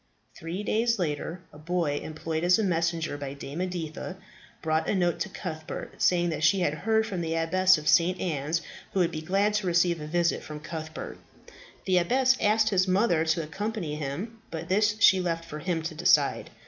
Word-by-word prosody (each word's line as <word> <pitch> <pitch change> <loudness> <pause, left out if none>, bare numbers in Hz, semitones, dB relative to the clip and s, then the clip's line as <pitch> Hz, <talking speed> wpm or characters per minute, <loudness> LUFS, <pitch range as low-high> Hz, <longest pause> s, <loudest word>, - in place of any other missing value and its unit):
Three 170 +5 -5
days 230 +3 +1
later, 165 0 -3
a 150 - -13
boy 165 -2 -1
employed 160 +1 -4
as 180 +1 +5
a 220 - 0
messenger 165 -4 -1
by 140 -1 -5
Dame 140 +4 -6
Editha 175 -4 -4 0.5
brought 160 0 0
a - - +1
note 175 -2 +1
to 210 - -2
Cuthbert, 160 -5 -7
saying 175 -1 +3
that 155 -1 -3
she 195 +3 +4
had 150 -4 +1
heard 220 +8 +1
from 190 -5 -3
the 165 -1 -2
Abbess 185 +3 +4
of 150 0 -7
St. 180 +3 +4
Anne's, 160 0 -1 0.3
who 195 - +1
would 175 -2 +2
be 155 - -4
glad 195 +6 +1
to 210 -3 0
receive 170 -1 +2
a 150 - -6
visit 170 +1 +1
from 150 0 -8
Cuthbert. 160 +1 -7 0.7
The 185 -1 +4
abbess 255 +9 +3
had - - +1
asked 215 +1 +3
his 190 -2 +2
mother 185 -3 +3
to 160 0 +1
accompany 190 +1 -4
him; 155 - -5
but 165 +1 -6
this 210 +2 +3
she 190 -3 +6
left 165 -2 -2
for 150 -2 -7
him 165 0 -2
to 165 0 -4
decide. 155 -3 +2
170 Hz, 200 wpm, -27 LUFS, 160-190 Hz, 0.7 s, she